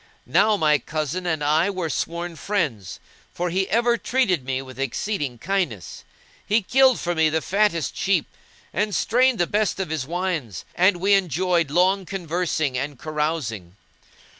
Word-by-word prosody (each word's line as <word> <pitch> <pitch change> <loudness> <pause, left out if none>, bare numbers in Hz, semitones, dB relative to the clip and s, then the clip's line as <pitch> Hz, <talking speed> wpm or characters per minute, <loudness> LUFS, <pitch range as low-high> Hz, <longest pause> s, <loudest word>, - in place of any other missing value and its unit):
Now 215 -1 +3
my 150 -4 +3
cousin 155 +4 -3
and 160 -3 -1
I 155 +5 +3
were 185 -4 -2
sworn 170 +2 -3
friends; 155 - -2 0.4
for 175 0 -2
he 190 +2 0
ever 235 +1 +3
entreated 230 - 0
me 130 0 -2
with 130 0 -12
exceeding 135 - -2
kindness; 160 - -3 0.4
he 210 +1 +1
killed 260 +4 +4
for 175 - -1
me 160 -2 +3
the 160 +1 +1
fattest 195 -3 0
sheep 190 -5 +1 0.5
and 205 +2 0
strained 250 +2 +3
the 175 - +2
best 210 +1 0
of 185 -5 -3
his 145 -5 -3
wines, 165 - -3
and 185 +1 +3
we 195 +3 +2
enjoyed 180 -3 +1
long 185 +4 +2
conversing 165 -7 -1
and 140 +1 -4
carousing. 150 - -3
175 Hz, 155 wpm, -23 LUFS, 150-195 Hz, 0.5 s, killed